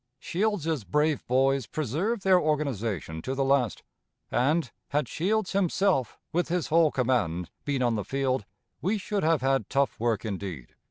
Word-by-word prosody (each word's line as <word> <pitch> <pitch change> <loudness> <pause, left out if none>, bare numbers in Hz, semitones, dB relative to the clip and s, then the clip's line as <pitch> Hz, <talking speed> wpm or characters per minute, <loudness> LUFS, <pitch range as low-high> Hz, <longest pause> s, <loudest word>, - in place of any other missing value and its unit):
"Shields's 165 - -1
brave 150 +5 +1
'boys' 135 0 +2
preserved 170 - -1
their 190 -2 +5
organization 115 - -1
to 130 +10 -3
the 135 - +1
last; 135 -5 +1 0.5
and, 145 +3 +1 0.2
had 145 -2 0
Shields 205 - 0
himself, 190 - +1 0.2
with 175 +1 +1
his 175 -1 -1
whole 165 0 +5
command, 115 - 0
been 140 -3 0
on 120 -1 +2
the 105 -2 -1
field, 135 +1 -1 0.4
we 195 +8 +1
should 205 0 -2
have 160 -3 +2
had 135 -4 +1
tough 140 0 +1
work 115 -1 0
indeed." 95 - -5
140 Hz, 155 wpm, -27 LUFS, 120-165 Hz, 0.5 s, their